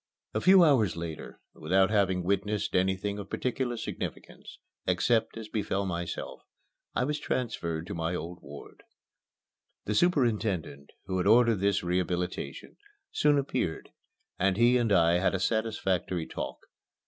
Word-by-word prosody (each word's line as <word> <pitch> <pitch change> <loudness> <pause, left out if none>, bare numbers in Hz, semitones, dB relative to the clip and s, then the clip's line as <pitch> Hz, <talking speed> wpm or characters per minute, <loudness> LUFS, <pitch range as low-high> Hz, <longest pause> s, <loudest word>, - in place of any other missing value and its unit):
XV - - -38
A - - +1
few 185 -1 +7
hours 115 - +3
later, 85 -2 -7
without 95 +5 +2
having 95 -4 +2
witnessed 100 +3 -1
anything 95 +2 0
of 100 - -8
particular 125 -1 -2
significance, - - -7 0.3
except 115 -1 +1
as 110 - -6
it 105 - -17
befell 100 -2 -1
myself, 85 -2 -4 0.5
I - - +1
was 150 +3 -1
transferred 85 -10 -3
to - - -6
my 85 +1 -2
old 85 +2 -6
ward. 70 +1 -12 1.0
The 105 - -1
superintendent, 110 - 0 0.2
who 95 +1 -2
had 90 - 0
ordered 115 0 +5
this 100 0 +1
rehabilitation, 90 0 -3 0.3
soon 145 -1 +3
appeared, 130 -11 -2 0.5
and 95 0 +2
he 120 +2 +5
and 115 -3 0
I 85 -2 +4
had 95 +1 +1
a - - -1
satisfactory 95 -5 -1
talk. - - -5
100 Hz, 145 wpm, -29 LUFS, 90-115 Hz, 1.0 s, few